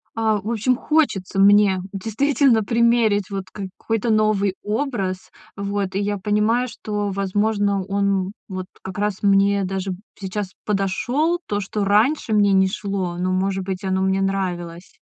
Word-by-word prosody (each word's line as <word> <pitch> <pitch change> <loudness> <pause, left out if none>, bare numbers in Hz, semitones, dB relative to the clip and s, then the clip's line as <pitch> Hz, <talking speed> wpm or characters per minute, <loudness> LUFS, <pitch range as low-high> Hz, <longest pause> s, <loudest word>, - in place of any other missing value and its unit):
А, 220 -2 +1
в 215 +4 -4
общем, 235 +3 +1
хочется 245 -10 0
мне, 200 -1 +5
действительно, 230 +4 +2
примерить, 230 -3 +2
вот, 195 -1 -3
какой-то 210 +3 -3
новый 215 -3 +2
образ. 210 -5 -2 0.3
Вот, 200 -1 -3
и 195 - +1
я 205 0 -1
понимаю, 210 +5 +1
что, 210 -3 -3
возможно, 200 +1 0
он, 200 +1 -1 0.2
м, 195 - -6 0.2
вот, 185 -2 -5 0.2
как 190 +1 -6
раз, 205 -1 -2
мне 200 0 +3
даже, 190 0 -3 0.2
сейчас 195 0 -4
подошёл. 245 - 0
То, 205 - -1
что 205 +1 -3
раньше 220 +5 +2
мне 205 -1 +4
не 190 0 +4
шло, 190 -3 -3
но, 185 +1 -1
может 190 +1 0
быть, 190 0 -4
оно 190 0 0
мне 190 0 +1
нравилось. 180 -3 -3
200 Hz, 150 wpm, -21 LUFS, 190-215 Hz, 0.3 s, мне